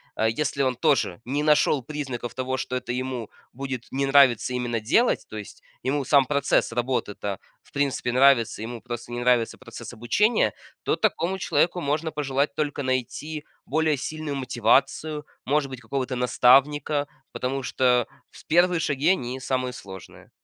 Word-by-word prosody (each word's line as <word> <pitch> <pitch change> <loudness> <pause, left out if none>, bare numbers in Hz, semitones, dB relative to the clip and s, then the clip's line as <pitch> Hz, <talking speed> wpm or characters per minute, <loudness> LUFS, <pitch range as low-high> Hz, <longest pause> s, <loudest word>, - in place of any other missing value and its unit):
а, 110 - +1
если 140 +4 0
он 130 -1 +1
тоже 115 -7 +1
не 140 +4 -1
нашел 150 -2 +3
признаков 130 -4 -5
того, 130 0 -2
что 130 - -3
это 125 -1 -3
ему 125 -3 -3 0.2
будет 130 -2 -5
не 135 +1 0
нравится 135 -4 +5
именно 120 -2 -1
делать, 150 - +2
то 110 - -7
есть 105 -3 -9 0.2
ему 140 +2 0
сам 140 0 +5
процесс 140 -2 +1
работы-то 115 -5 -2 0.2
в - - -25
принципе 140 -3 -1
нравится, 125 -4 +4
ему 115 0 -6
просто 120 0 -7
не 120 - -3
нравится 120 -2 +2
процесс 120 -1 -9
обучения, 120 - +2 0.3
то - - 0
такому 175 +4 0
человеку 175 0 +1
можно 155 +1 -1
пожелать 140 -1 -1
только 150 -1 -2
найти 140 +4 -3 0.2
более 155 +1 +2
сильную 155 +1 -4
мотивацию, 135 +4 +1 0.2
может 145 0 +1
быть, 130 -2 -8
какого-то 130 +2 -3
наставника, 140 +4 +3 0.2
потому 135 +2 -2
что 125 0 +2 0.2
с - - -15
1 175 +2 +3
шаги 145 0 +1
они 130 -8 0
самые 130 -1 -1
сложные. 95 -6 -11
130 Hz, 155 wpm, -25 LUFS, 120-145 Hz, 0.3 s, нравится